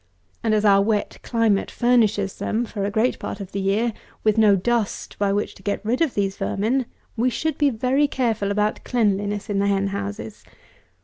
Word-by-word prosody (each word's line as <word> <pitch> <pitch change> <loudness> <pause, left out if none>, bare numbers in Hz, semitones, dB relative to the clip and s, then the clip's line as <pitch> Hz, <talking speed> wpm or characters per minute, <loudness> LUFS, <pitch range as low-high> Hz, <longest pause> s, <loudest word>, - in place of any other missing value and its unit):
And 220 -1 +2
as 215 0 +1
our 200 -1 +6
wet 210 0 -1
climate 225 -4 +1
furnishes 220 -5 +1
them, 230 +3 -1
for 205 -3 -4
a - - 0
great 220 +4 +1
part - - -5
of 195 -2 -7
the 200 - -3
year, 210 +4 +1 0.3
with 215 -1 +3
no 215 -2 +5
dust 225 +2 -1
by 200 -1 +2
which 205 +1 -1
to - - -17
get 205 - -2
rid 240 +6 0
of 320 -6 +1
these 195 -1 -1
vermin, 235 +5 0 0.3
we 240 +3 +2
should 315 +7 -2
be 290 -1 +3
very 260 +4 +1
careful 225 -7 -1
about 210 +1 0
cleanliness 205 -3 0
in 200 -1 -1
the 200 - +2
hen 200 0 +1
houses. 200 +2 -5
215 Hz, 195 wpm, -23 LUFS, 200-235 Hz, 0.3 s, our